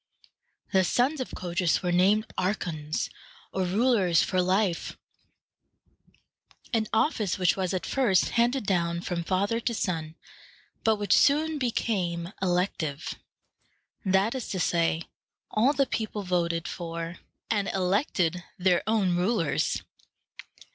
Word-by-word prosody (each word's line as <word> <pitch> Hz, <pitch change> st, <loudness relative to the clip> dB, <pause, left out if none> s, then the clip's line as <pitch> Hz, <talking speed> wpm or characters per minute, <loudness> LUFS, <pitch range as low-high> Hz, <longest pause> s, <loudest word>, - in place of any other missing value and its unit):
The 190 Hz, -1 st, +5 dB
sons 260 Hz, -, +1 dB
of 255 Hz, -, -5 dB
Codrus 175 Hz, 0 st, 0 dB
were 180 Hz, -, 0 dB
named 195 Hz, +5 st, +4 dB
archons, 170 Hz, -5 st, -2 dB, 0.5 s
or 190 Hz, -1 st, 0 dB
rulers 195 Hz, -3 st, +3 dB
for 185 Hz, -, +1 dB
life, 185 Hz, -1 st, 0 dB, 1.8 s
an 220 Hz, -2 st, +1 dB
office 220 Hz, -, +1 dB
which 180 Hz, -2 st, +3 dB
was 185 Hz, -2 st, -1 dB
at 185 Hz, -2 st, -2 dB
first 235 Hz, -9 st, +2 dB
handed 240 Hz, +1 st, +1 dB
down 170 Hz, -3 st, 0 dB
from 175 Hz, -1 st, -3 dB
father 200 Hz, +6 st, 0 dB
to 235 Hz, 0 st, -2 dB
son, 165 Hz, -6 st, -2 dB, 0.7 s
but 220 Hz, -1 st, +4 dB
which 205 Hz, -1 st, +1 dB
soon 305 Hz, +2 st, +3 dB
became 185 Hz, -8 st, -1 dB
elective; 175 Hz, -5 st, -1 dB, 0.9 s
that 195 Hz, +2 st, +2 dB
is 260 Hz, -4 st, -4 dB
to 185 Hz, -, -3 dB
say, 165 Hz, -1 st, +1 dB, 0.5 s
all 235 Hz, +6 st, +3 dB
the 280 Hz, -1 st, +2 dB
people 220 Hz, -4 st, -3 dB
voted 170 Hz, -2 st, 0 dB
for 170 Hz, 0 st, -5 dB, 0.3 s
and 205 Hz, -3 st, +1 dB
elected 185 Hz, -, 0 dB
their 180 Hz, -1 st, +3 dB
own 205 Hz, -5 st, +2 dB
rulers. 180 Hz, -2 st, 0 dB
185 Hz, 120 wpm, -27 LUFS, 175-220 Hz, 1.8 s, The